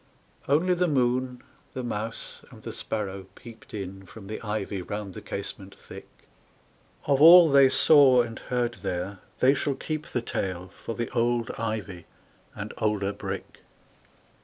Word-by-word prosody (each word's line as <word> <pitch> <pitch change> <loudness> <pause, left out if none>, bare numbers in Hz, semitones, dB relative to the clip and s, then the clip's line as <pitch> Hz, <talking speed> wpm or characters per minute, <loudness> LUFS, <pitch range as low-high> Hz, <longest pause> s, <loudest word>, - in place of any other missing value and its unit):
Only 165 +6 +3
the 180 0 +1
moon, 125 -3 0 0.3
the 130 - -4
mouse, 115 -1 -5
and - - -15
the - - -6
sparrow 100 -3 -5
peeped 115 -2 -14
In 95 -2 -6
from 95 +3 -12
the 110 +2 -6
ivy 105 -3 -3
round 105 +1 -6
the - - -8
casement 100 -1 -7
thick. - - -12 1.0
Of 140 -1 +2
all 170 0 +9
they 135 -1 +7
saw 130 -4 +6
and 115 -1 -7
heard 120 -1 -2
there 90 +2 -4 0.2
they 130 +2 +6
shall 140 0 -1
keep 155 +2 -5
The 120 - -3
tale 95 -4 -3
for 115 +4 -7
the 120 -1 -4
old 120 0 0
ivy 105 -6 -4 0.5
and - - -6
older 100 -2 0
brick. 100 -1 -7
115 Hz, 150 wpm, -26 LUFS, 100-130 Hz, 1.0 s, all